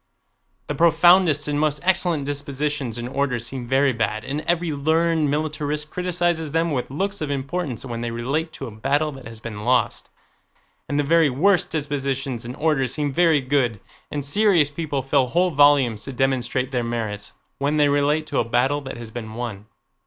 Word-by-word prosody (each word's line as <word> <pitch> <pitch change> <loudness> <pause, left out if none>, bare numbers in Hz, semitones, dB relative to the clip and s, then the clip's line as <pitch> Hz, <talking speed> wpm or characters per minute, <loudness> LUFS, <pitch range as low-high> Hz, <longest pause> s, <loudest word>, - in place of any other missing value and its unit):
The - - -3
profoundest 170 -2 +4
and 145 0 0
most 150 -1 +1
excellent 175 -5 +1
dispositions 145 -3 -3
and 120 0 -4
orders 125 -3 -1
seem 125 -1 -5
very 135 +1 +3
bad, 110 -1 -1
and 140 +4 -3
every 175 -1 +1
learned 160 +1 +1
militarist 150 0 -2
criticizes 175 -3 -1
them 165 0 +1
with 130 -4 -2
looks 195 +8 -3
of 150 - -2
importance, 140 -1 -3
when 115 -2 -5
they 120 - -2
relate 135 +8 -2
to 135 - -6
a 120 - -7
battle 140 +8 0
that 135 -4 -10
has 115 -1 -9
been 110 -2 -7
lost, 125 +2 +1 0.8
and 145 - -1
the - - +2
very 160 +1 +4
worst 175 +8 +2
dispositions 140 -5 -2
and 125 +2 -6
orders 145 -5 +1
seem 145 -2 -1
very 165 -2 +4
good, 130 -5 0 0.3
and 145 -2 -4
serious 170 -2 +3
people 145 -3 -3
fill 130 0 +2
whole 180 +6 +2
volumes 140 -7 +4
to 135 - -6
demonstrate 130 0 0
their 125 -2 0
merits, 110 -3 -4 0.3
when 145 +2 0
they 145 -1 +4
relate 145 +2 +2
to - - -1
a - - +3
battle 125 +5 +1
that 135 -3 -7
has 115 -2 -8
been 110 -1 -7
won. 110 -4 -5
140 Hz, 180 wpm, -23 LUFS, 125-155 Hz, 0.8 s, profoundest